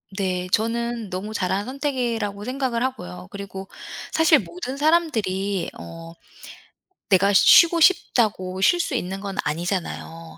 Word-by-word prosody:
네. 185 -2 -2
저는 230 -1 -1
너무 200 +4 -5
잘한 190 +1 -1
선택이라고 240 -7 -3
생각을 255 -2 -2
하고요. 90 - -4
그리고 195 -1 -8 0.4
사실 320 -1 +5
모든 185 +9 -6
사람들이 220 - 0
어 165 0 -10 1.0
내가 200 +1 +4
쉬고 335 - +7
싶다고 215 - +2
쉴 350 - +4
수 305 - -1
있는 195 -5 -3
건 195 -1 -5
아니잖아요. 165 0 -4
205 Hz, 270 characters per minute, -23 LUFS, 185-255 Hz, 1.0 s, 쉬고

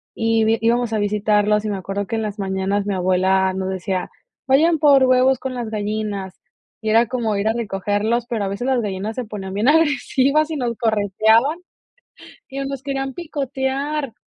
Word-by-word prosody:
y 225 0 +2
íbamos 235 0 +2
a - - +1
visitarlos 210 0 +1
y - - -1
me 200 - -2
acuerdo 195 +1 -4
que - - -3
en 220 - -1
las 210 -1 -5
mañanas 195 +1 -1
mi 205 - -1
abuela 185 +1 +2
nos 190 0 -3
decía: 190 0 -3 0.4
"Vayan 315 +5 +4
por 280 -3 +5
huevos 255 0 +3
con 265 -1 -4
las 240 -3 -4
gallinas", 210 -3 -4 0.4
y 220 - -2
era 230 +2 +4
como 230 -3 -1
ir 200 +2 -1
a 225 - +1
recogerlos, 215 +1 -1
pero 225 -4 -2
a - - -2
veces 200 +6 -3
las 260 -2 +2
gallinas 205 +1 -4
se 250 - -3
ponían 195 -3 -7
bien 210 +5 0
agresivas 300 -1 +2
y 315 - -2
nos 240 -3 -2
correteaban 220 - +2 0.9
y 270 - -6
nos 275 -1 -4
querían 270 -1 -3
picotear. 275 -3 -3
220 Hz, 180 wpm, -20 LUFS, 200-265 Hz, 0.9 s, por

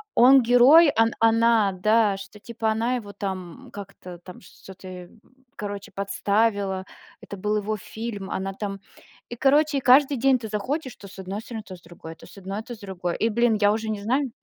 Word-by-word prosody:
он 260 +3 +7
герой, 255 +7 +6
он 225 +1 +3
она, 225 -2 +3
да, 215 +2 +2
что-то 205 +2 -12
типа 225 0 -3
она 230 +3 -1
его, 205 -5 -7
там, 190 -4 -7
как-то 195 -3 -10
там, 180 +1 -13
что-то, 185 -2 -12 0.5
короче 205 -1 -7
подставила. 200 -1 -1 0.4
Это 200 - -9
был 210 +2 -1
его 210 +1 -3
фильм, 210 -1 -7
она 195 +1 -3
там. 195 0 -6 0.5
И 240 - -6
короче 285 +1 +2
каждый 270 +3 +5
день 260 +1 +3
ты 225 - -7
заходишь: 260 +6 -4
то 200 - -12
с 195 - -13
одной 190 +3 -6
стороны, 225 -1 -8
то 190 - -9
с - - -23
другой, 165 -1 -12
то - - -16
с - - -16
одной, 195 +2 -6
то 240 - -9
с - - -19
другой. 185 -4 -5
И, 225 - +1
блин, 230 0 +2
я 205 0 +4
уже 220 0 -4
не 210 -2 -3
знаю. 255 +5 -1
210 Hz, 190 wpm, -24 LUFS, 195-235 Hz, 0.5 s, он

